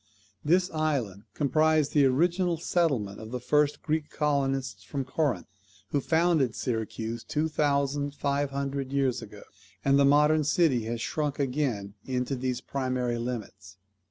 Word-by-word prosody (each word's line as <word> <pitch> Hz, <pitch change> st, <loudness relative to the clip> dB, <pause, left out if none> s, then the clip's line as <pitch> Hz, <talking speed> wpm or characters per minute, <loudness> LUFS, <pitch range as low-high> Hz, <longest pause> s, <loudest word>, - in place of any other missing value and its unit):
This 180 Hz, +4 st, +2 dB
island 135 Hz, -, -1 dB
comprised 155 Hz, +1 st, +2 dB
the 145 Hz, -3 st, +5 dB
original 170 Hz, +5 st, +2 dB
settlement 140 Hz, -, 0 dB
of 110 Hz, -, -8 dB
the 125 Hz, +1 st, -4 dB
first 150 Hz, +3 st, +1 dB
Greek 155 Hz, -1 st, -1 dB
colonists 135 Hz, -3 st, -1 dB
from 140 Hz, -2 st, -4 dB
Corinth, 130 Hz, -, -1 dB, 0.4 s
who 145 Hz, -, 0 dB
founded 160 Hz, -6 st, +2 dB
Syracuse 115 Hz, -1 st, -3 dB
two 155 Hz, +2 st, -1 dB
thousand 145 Hz, -1 st, 0 dB
five 140 Hz, 0 st, 0 dB
hundred 140 Hz, -1 st, -3 dB
years 135 Hz, -3 st, +1 dB
ago; 105 Hz, -2 st, -11 dB, 0.4 s
and 140 Hz, 0 st, +4 dB
the -, -, +6 dB
modern 150 Hz, +2 st, +4 dB
city 145 Hz, -6 st, +2 dB
has 115 Hz, 0 st, -3 dB
shrunk 150 Hz, +1 st, -2 dB
again 125 Hz, -8 st, -1 dB
into 125 Hz, +1 st, -2 dB
these 125 Hz, -1 st, -2 dB
primary 125 Hz, -3 st, -2 dB
limits. 100 Hz, -5 st, -6 dB
140 Hz, 140 wpm, -28 LUFS, 125-150 Hz, 0.4 s, the